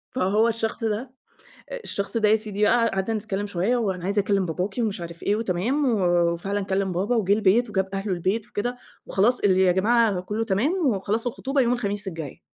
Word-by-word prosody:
فهو 215 0 +2
الشخص 225 +1 -3
ده 225 +4 -2 0.7
الشخص 200 +3 -3
ده 215 -2 +3
يا 220 - +6
سيدي 210 -1 -3
بقى 230 +1 +4
قعدنا 195 +3 -1
نتكلّم 205 -1 -3
شويّة، 200 +6 0
وأنا 190 -6 -2
عايز 200 +1 +1
أكلم 200 -2 +1
باباكي 185 +7 -3
ومش 205 -5 -2
عارف 170 0 -8
إيه 205 - +2
وتمام، 230 +8 0
وفعلًا 175 +2 +1
كلم 190 -1 -1
بابا 200 +7 0
وجه 200 -2 +2
البيت 220 +3 +3
وجاب 190 -1 0
أهله 195 0 -2
البيت 190 +5 -1
وكده، 245 +4 -3 0.3
وخلاص 235 +6 +3
اللي 190 -2 +3
يا 185 -1 +5
جماعة 210 -1 +2
كلّه 210 +4 -3
تمام، 225 - +1
وخلاص 215 +2 0
الخطوبة 270 +3 -1
يوم 245 0 +2
الخميس 205 -4 -3
الجاي. 160 -6 -7
205 Hz, 185 wpm, -24 LUFS, 190-225 Hz, 0.7 s, يا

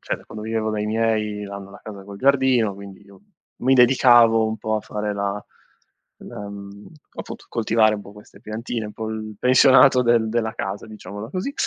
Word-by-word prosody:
cioè - - -3
da - - -18
quando 110 - -9
vivevo 110 0 -2
dai 105 -1 -2
miei 110 -1 -1
hanno 100 0 -9
la 100 - -14
casa 100 -3 -10
col 100 0 -10
giardino, 130 -5 +2
quindi 100 -1 -12
io 100 - -18 0.4
mi 130 +2 +3
dedicavo 120 -3 +5
un 110 0 -4
po' 110 - -2
a - - -3
fare 105 0 -4
la 100 0 -3 0.8
la 105 - -8
mhmm, 100 0 -11 0.3
appunto - - -8
coltivare 110 -1 +2
un 105 - -6
po' 100 - -13
queste 105 0 -17
piantine, 110 +1 -5
un 105 - -9
po' 110 0 -6
il 110 -1 -6
pensionato 130 0 +5
del 120 -2 +2
della 110 -1 -1
casa, 100 +2 -5
diciamola 105 0 -9
così, 185 - -4
110 Hz, 190 wpm, -22 LUFS, 105-115 Hz, 0.8 s, dedicavo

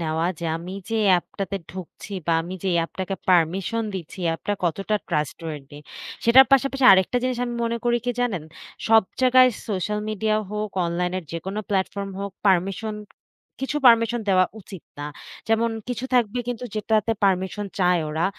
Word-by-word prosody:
নেওয়া 160 +1 -1
যে 170 - -6
আমি 175 +3 -8 0.2
যে 225 - 0
অ্যাপটাতে 195 +2 0
ঢুকছি 185 +3 -9
বা 170 - +2
আমি 180 +3 -6
যে - - -3
এই - - +2
অ্যাপটাকে 190 +3 -4
পারমিশন 185 +6 +2
দিচ্ছি, 190 +2 -7
অ্যাপটা 195 +5 -1
কতটা 195 +5 -1
trustworthy 150 -2 -4 0.5
সেটার 260 +3 +8
পাশাপাশি 275 0 +3
আরেকটা 190 +6 +3
জিনিস 255 -1 -1
আমি 240 -1 -4
মনে 230 0 -1
করি 240 0 +2
কি 245 - +1
জানেন? 215 -10 -1 0.5
সব 225 0 +7 0.2
জায়গায় 255 0 +6 0.2
সোশ্যাল 210 +1 -1
মিডিয়া 215 0 0
হোক, 210 0 -3 0.2
অনলাইন 175 +1 -1
এর - - -7
যেকোন 170 +4 -5
প্লাটফর্ম 195 0 -1
হোক 200 0 -4 0.2
পারমিশন, 195 +3 +1 0.7
কিছু 270 +2 -2
পারমিশন 230 0 +5
দেওয়া 185 -1 +5 0.2
উচিত 190 -2 -11 0.2
না। 145 - -4 0.4
যেমন 225 +1 +2 0.2
কিছু 245 0 -3
থাকবে 240 -1 +2
কিন্তু 245 0 -3
যেটাতে 215 +1 +1
পারমিশন 190 +2 0
চায় 180 -2 +3
ওরা 160 +2 -1
195 Hz, 160 wpm, -23 LUFS, 180-230 Hz, 0.7 s, সেটার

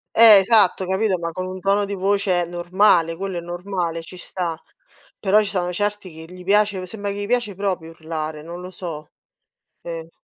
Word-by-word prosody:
Eh 220 -3 +9
esatto, 195 -2 +3
capito, 190 -1 +1
ma 170 0 -3
con 185 +3 -4
un 185 0 -6
tono 200 +2 +2
di 200 - -5
voce 195 -2 +1
normale, 175 0 +2
quello 190 +1 -4
è - - -3
normale, 175 -1 -3
ci 175 +3 -12
sta. 175 -2 -4 0.6
Però 200 +1 +3
ci 210 -2 0
sono 180 -3 -1
certi 205 0 -2
che 160 +2 -12
gli 180 0 -11
piace 205 -1 +2
sembra 200 +1 -5
che 200 - -6
gli 205 0 -4
piace 240 -3 0
proprio 185 -4 -3
urlare, 160 -1 -5
non 170 +3 -8
lo 180 +1 -8
so 160 -5 -7 0.7
Sì. 165 -1 -7
185 Hz, 190 wpm, -22 LUFS, 170-200 Hz, 0.7 s, Eh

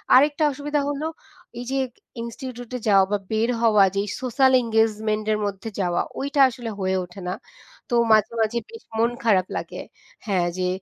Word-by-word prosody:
আরেকটা 290 +4 +4
অসুবিধা 290 +1 -1
হলো, 290 +2 -2 0.5
এই 245 - -5
যে 270 - +1 0.4
ইনস্টিটিউট 245 +1 -7
এ - - -8
যাওয়া 195 -2 +6
বা 205 - +3
বের 220 +2 +1
হওয়া 215 -4 +6
যে 200 - +2 0.2
সোশ্যাল 260 +1 +3
এনগেজমেন্ট 220 -1 +1
এর - - +1
মধ্যে 200 +2 -4
যাওয়া 175 -2 +1 0.2
ওইটা 280 +1 +1
আসলে 240 -2 -6
হয়ে 190 0 0
ওঠে 180 +2 -12
না - - -1 0.6
তো 240 - +1 0.2
মাঝে, 215 -1 +5
মাঝে 220 +2 +1
বেশ 455 0 -11 0.2
মন 230 +1 +3
খারাপ 190 -5 +3
লাগে। - - -6 0.5
হ্যাঁ, 185 -4 +1
যে 185 0 0
225 Hz, 170 wpm, -23 LUFS, 205-260 Hz, 0.6 s, যাওয়া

